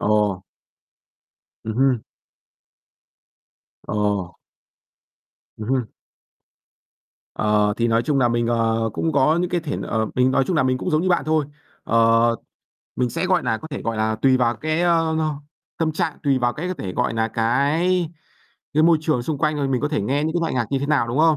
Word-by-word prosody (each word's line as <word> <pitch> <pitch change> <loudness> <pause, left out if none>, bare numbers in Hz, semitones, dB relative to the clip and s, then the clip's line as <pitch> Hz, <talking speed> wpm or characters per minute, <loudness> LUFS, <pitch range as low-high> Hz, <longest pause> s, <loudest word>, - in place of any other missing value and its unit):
Ồ. 105 -3 +1 1.2
Ừm 110 - -4
hưm. 130 -3 +2 1.9
Ồ. 100 -4 -1 1.2
Ừm 105 0 -6
hưm. 125 -4 -1 1.4
Ờ, 105 -1 +2
thì 120 0 +1
nói 115 0 +2
chung 145 +2 0
nà 125 -2 +3
mình, 120 0 0
ờ, 115 -1 +1
cũng 165 +8 -1
có 155 +3 +3
những 180 0 -1
cái 175 - 0
thể 160 -3 -4
ờ, 110 -1 -1
mình 125 +1 +3
nói 130 - +2
chung 180 - 0
nà 155 - +4
mình 130 -1 +1
cũng - - -3
giống 155 +1 +2
như 185 - 0
bạn 175 - +2
thôi. 155 -1 +1 0.4
Ờ, 115 +1 +3 0.6
mình 125 -1 0
sẽ, 155 - -2
gọi 185 -1 +2
nà, 110 - -1
có 160 - -10
thể, 140 - -5
gọi 115 -1 -2
là, 110 0 0
tùy 130 -1 +5
vào 120 -2 +1
cái, 155 +5 -1
ơ, 165 -2 +2 0.6
tâm 160 -1 0
trạng, 155 0 -2
tùy 140 -3 +2
vào 120 -1 +1
cái 175 +7 -5
có 185 - -2
thể, 100 - -6
gọi 125 +2 0
nà, 115 0 0
cái 145 +11 +1 0.7
cái 155 - +4
môi 165 0 +5
trường 155 -6 0
xung 145 +3 -3
quanh 150 +2 +1
rồi 140 -2 -1
mình 130 -2 0
có 145 - 0
thể 150 - -1
nghe 140 +8 0
những 160 - -1
cái - - +1
loại 165 -4 -1
nhạc 120 -3 0
như 135 - +2
thế 140 - -3
nào, 145 -5 +1
đúng 120 +4 -2
không? 160 0 +4
130 Hz, 200 wpm, -22 LUFS, 115-155 Hz, 1.9 s, tùy